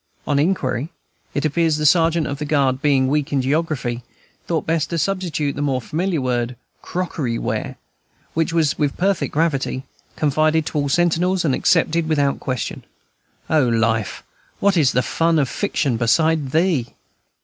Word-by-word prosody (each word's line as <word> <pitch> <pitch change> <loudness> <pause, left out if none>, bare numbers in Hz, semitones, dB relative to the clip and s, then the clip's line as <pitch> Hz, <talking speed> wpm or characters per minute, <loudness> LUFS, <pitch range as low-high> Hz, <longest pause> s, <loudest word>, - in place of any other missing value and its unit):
On 145 -1 +1
inquiry, 145 -5 0 0.5
it 145 - 0
appears 160 +1 +2
that - - -4
the - - 0
sergeant 165 +1 +4
of 140 0 -4
the 150 - -3
guard, 140 -3 +1
being 135 -3 +3
weak 145 +1 0
in 140 - +1
geography, 135 -3 -1 0.5
thought 165 -3 -1
best 160 -2 0
to 170 - -2
substitute 165 -6 -1
the 145 - -4
more 135 -3 0
familiar 165 +6 -2
word, 125 -1 -1 0.3
"Crockery 155 -9 -3
ware"; - - -3 0.6
which 165 0 0
was, 160 -4 +1
with 145 -2 0
perfect 195 +1 0
gravity, 140 -4 0 0.3
confided 155 +1 +2
to 150 - -2
all - - +1
the - - -2
sentinels, 175 +3 +2
and 140 - +2
accepted 165 +1 +2
without 145 -3 +1
question. 130 -4 -4 0.6
O 150 -5 +3
life! 115 -2 0 0.4
what 200 -1 +3
is 145 -6 +3
the 125 - +2
fun 165 0 +1
of 140 -3 +2
fiction 140 - -1
beside 155 +5 +2
thee? 160 -5 0
150 Hz, 165 wpm, -21 LUFS, 135-165 Hz, 0.6 s, sergeant